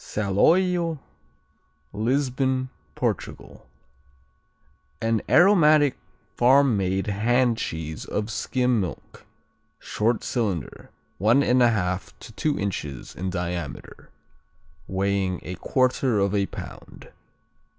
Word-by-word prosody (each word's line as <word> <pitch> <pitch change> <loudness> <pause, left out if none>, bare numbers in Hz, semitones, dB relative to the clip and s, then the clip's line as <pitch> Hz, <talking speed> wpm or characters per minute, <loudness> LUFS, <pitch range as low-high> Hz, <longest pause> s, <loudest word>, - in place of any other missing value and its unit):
Saloio 165 - +1 1.0
Lisbon, 130 +3 0 0.3
Portugal - - -4 1.3
An 115 -1 0
aromatic 155 -6 +5 0.4
farm 130 0 +4
made 95 0 -1
hand 115 +3 +1
cheese 80 -5 -5
of 105 +2 -3
skim 125 -1 0
milk. 90 -6 -8 0.5
Short 110 +2 -1
cylinder, 100 - -3 0.3
1 115 +8 +4
1/2 110 -8 +1
to 115 - -11
two 150 +6 -1
inches 75 -10 -4
in 95 +1 -3
diameter, 85 -6 -5 0.8
weighing 95 -1 -1
a 90 - -6
quarter 130 -2 +1
of 100 0 +1
a 100 -1 +1
pound. - - -11
110 Hz, 90 wpm, -24 LUFS, 95-130 Hz, 1.3 s, aromatic